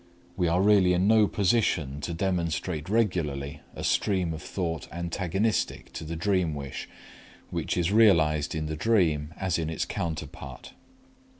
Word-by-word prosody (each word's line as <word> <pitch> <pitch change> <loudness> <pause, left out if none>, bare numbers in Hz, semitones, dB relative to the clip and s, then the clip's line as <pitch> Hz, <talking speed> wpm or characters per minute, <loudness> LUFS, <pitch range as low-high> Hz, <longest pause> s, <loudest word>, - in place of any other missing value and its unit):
We 90 -2 +1
are 90 +3 +2
really 100 -3 +5
in 90 +2 +2
no 110 -1 +5
position 90 - +1
to 85 - -3
demonstrate 85 -2 -2
regularly 85 -11 0
a - - -6
stream 90 -5 +1
of 80 - -6
thought 80 -5 -3
antagonistic 90 +5 -1
to - - -6
the 80 +1 -5
dream 90 -2 +1
wish 70 -1 -6 0.6
which - - -2
is 90 +1 +1
realized 80 -10 +4
in 80 -1 -2
the 80 0 -3
dream 80 -5 +2
as 95 -3 0
in 80 -1 -2
its 80 - -2
counterpart. 75 -6 -6
85 Hz, 145 wpm, -27 LUFS, 75-95 Hz, 0.6 s, really